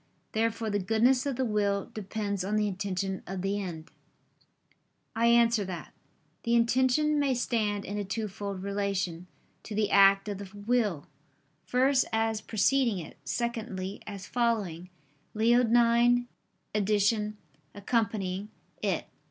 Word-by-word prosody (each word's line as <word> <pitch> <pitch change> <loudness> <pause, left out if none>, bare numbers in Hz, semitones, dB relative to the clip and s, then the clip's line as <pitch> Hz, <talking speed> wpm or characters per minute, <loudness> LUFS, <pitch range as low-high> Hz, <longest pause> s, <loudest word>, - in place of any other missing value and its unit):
Therefore 225 0 -1
the 205 - +1
goodness 235 +7 +2
of 275 - -1
the 260 +1 0
will 205 -1 0
depends 200 -2 -3
on 205 +3 -1
the 210 0 +2
intention 190 -1 -3
of 190 -1 -4
the 200 +1 -1
end. 170 -4 -7 1.2
I 230 +1 +3
answer 235 -2 +4
that, 180 -3 -7 0.5
The 235 0 +1
intention 260 +6 +3
may 275 -3 +2
stand 215 -4 -1
in 205 +1 -4
a - - -1
twofold 200 -1 -4
relation 195 -3 -2 0.3
to 215 - -7
the 210 -1 +1
act 195 0 +6
of 200 -2 -4
the 200 -2 -8
will; 205 -7 0 0.6
first, 260 +2 +3
as 225 -1 0
preceding 230 +1 +2
it, 170 - -8
secondly 215 -5 -3
as 200 -2 -7
following 205 -9 -1 0.5
[*Leonine 240 +1 +4 0.5
edn.: 210 +1 +1 0.4
'accompanying'] 205 -2 -1 0.3
it. - - -1
210 Hz, 125 wpm, -29 LUFS, 195-235 Hz, 1.2 s, act